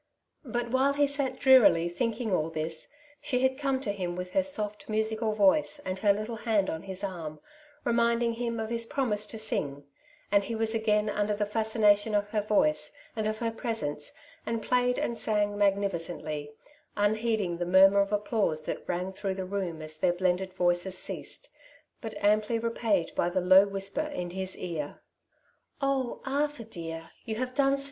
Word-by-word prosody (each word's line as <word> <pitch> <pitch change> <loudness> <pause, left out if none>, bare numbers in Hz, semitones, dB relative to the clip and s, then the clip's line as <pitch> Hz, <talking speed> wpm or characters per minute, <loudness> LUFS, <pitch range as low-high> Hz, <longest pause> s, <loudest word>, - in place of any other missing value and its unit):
But 240 -1 -3
while 265 +2 +3
he 290 0 +3
sat 280 -1 -2
drearily 245 -11 +6
thinking 225 +3 -2
all 160 -2 +1
this, 160 0 -4 0.3
she 255 -3 0
had 260 +1 +2
come 275 -2 0
to 210 - -1
him 180 -3 -3
with 180 0 -5
her 290 - +3
soft 215 -8 -2
musical 220 0 0
voice 215 +9 +3
and 185 0 -3
her 205 0 +4
httle 215 +3 -3
hand 215 -5 +1
on 160 - -4
his 190 +1 -6
arm, 165 -6 -5 0.5
re 240 - +2
minding 235 0 +2
him 230 0 -3
of 220 0 -3
his 230 -1 0
promise 215 -6 -1
to 225 - -6
sing, 145 -10 -2 0.5
and 200 0 +4
he 230 - -3
wag 220 0 0
again 215 -1 +2
imder 210 0 0
the 210 - +1
fascination 215 -1 +2
of 205 0 +1
her 210 0 0
voice 155 -8 +1 0.2
and 215 -1 -1
of 215 0 -1
her 230 0 -1
presence, 225 - -2 0.3
and 230 -1 -3
played 250 +1 +2
and 235 - -2
sang 210 -1 +1
msM^ificently, 175 -7 -1 0.5
un 205 +1 +3
lieieding 215 -6 -1
the 175 - -2
murmur 195 +2 +6
of 200 +1 -1
applause 205 -7 0
that - - -5
rang 180 +2 -2
through 190 0 -3
rocm 185 -4 -3
as 155 0 -6
their 175 - +3
bleiiderd 185 +1 0
voic 175 -1 +1
es 185 -1 -4
ceased, - - -4 0.5
but 225 -2 -6
amply 210 +2 +3
id 225 -5 0
br - - +1
the 185 +1 0
low 185 +2 +6
whi5T>er 200 +10 -2
in 175 -1 -4
hijs 190 +1 -1
ear, 160 -5 -5 0.4
— - - -34
Cfc, 270 -3 0
Arthur 285 -1 -1
dear, 165 -6 -7
you 220 -2 -4
Lave 255 +1 -3
done 275 +1 +3
Kp! - - -7
210 Hz, 185 wpm, -29 LUFS, 185-230 Hz, 0.5 s, drearily